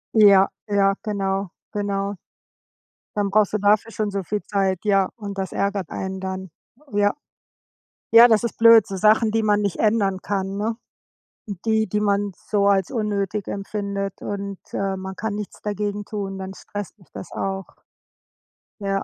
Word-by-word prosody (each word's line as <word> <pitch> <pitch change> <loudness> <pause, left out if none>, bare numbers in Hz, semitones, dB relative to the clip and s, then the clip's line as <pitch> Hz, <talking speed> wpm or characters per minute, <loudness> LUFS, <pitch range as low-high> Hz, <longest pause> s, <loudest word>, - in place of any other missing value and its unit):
Ja, 200 -2 +7 0.2
ja, 200 -1 +3
genau, 195 -3 -2 0.2
genau. 200 -1 -2 1.0
Dann 205 -1 +1
brauchst 210 0 +3
du 215 - +1
dafür 210 +3 +3
schon 215 -1 -2
so 195 -1 -3
viel 205 +4 -2
Zeit, 195 -3 0
ja, 195 -2 +3
und 200 -2 -6
das 190 -1 -3
ärgert 200 -3 -2
einen 190 0 -4
dann. 190 -1 -5 0.4
Ja. 205 0 +2 1.0
Ja, 230 +1 +10
das 220 -1 +4
ist 235 - -2
blöd, 230 -2 +7
so 195 - -5
Sachen, 215 +3 +4
die 225 0 +1
man 210 -1 +3
nicht 200 -3 -1
ändern 205 -4 +2
kann, 195 -1 -2
ne? 220 +2 -1 0.9
Die, 220 -1 +2
die 210 +3 0
man 205 -1 +1 0.2
so 200 -1 +2
als 195 +2 +2
unnötig 210 -3 -2
empfindet, 200 -1 -4
und, 200 -1 -5
äh, 195 -1 -1
man 190 0 -6
kann 220 0 -3
nichts 210 -1 -6
dagegen 205 0 -2
tun. 195 -2 -4
Dann 190 0 -6
stresst 205 +2 -8
dich 185 - -21
das - - -9
auch. 195 -1 -3 1.1
Ja. 195 -1 -1
200 Hz, 160 wpm, -23 LUFS, 195-210 Hz, 1.1 s, Ja